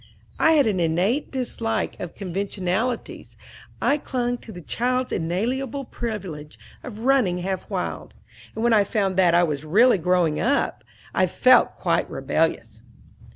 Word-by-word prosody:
I 320 - +5
had 295 -3 +4
an 205 -4 0
innate 180 - +1
dislike 240 -3 -3
of 175 - -7
conventionalities. 195 +4 -3 0.4
I 285 - +2
clung 245 -3 -2
to 225 - -11
the 175 - -9
child's 250 - -1
inalienable 240 +11 -2
privilege 190 -12 -6 0.2
of 220 -3 -9
running 245 -8 +2
half 185 +1 -4
wild; - - -4 0.4
and 220 - -3
when 240 -1 +4
I 210 -2 +5
found 195 -2 -1
that 175 -3 +4
I 175 - +5
really 175 - +3
was - - -12
growing 175 -4 +2
up, - - 0 0.3
I - - +2
felt - - +4
quite - - 0
rebellious. - - -1
205 Hz, 145 wpm, -23 LUFS, 175-245 Hz, 0.4 s, I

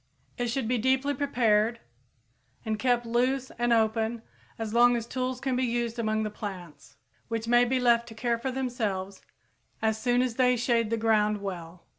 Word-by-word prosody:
It 245 -1 -2
should 240 0 -2
be 245 0 +1
deeply 265 +4 +1
prepared 235 -5 +1 0.9
and 215 -1 -2
kept 245 -1 +1
loose 255 +3 0
and 240 0 +1
open 225 0 +1 0.3
as 220 -1 -4
long 240 +1 +5
as 230 - -4
tools 255 +1 -3
can 265 -1 -1
be 255 - 0
used 235 -1 -1
among 220 -1 0
the 215 - -3
plants, 175 - -9 0.3
which 230 -1 -3
may 240 +1 +5
be 255 +1 0
left 235 -1 +3
to 225 - -11
care 235 +1 -1
for 265 - -3
themselves 215 -7 -3 0.6
as 220 0 0
soon 245 +1 +2
as 245 -3 -3
they 250 -1 +4
shade 235 -2 +1
the 230 - 0
ground 215 -2 +2
well. 175 -3 -7
235 Hz, 180 wpm, -28 LUFS, 220-250 Hz, 0.9 s, long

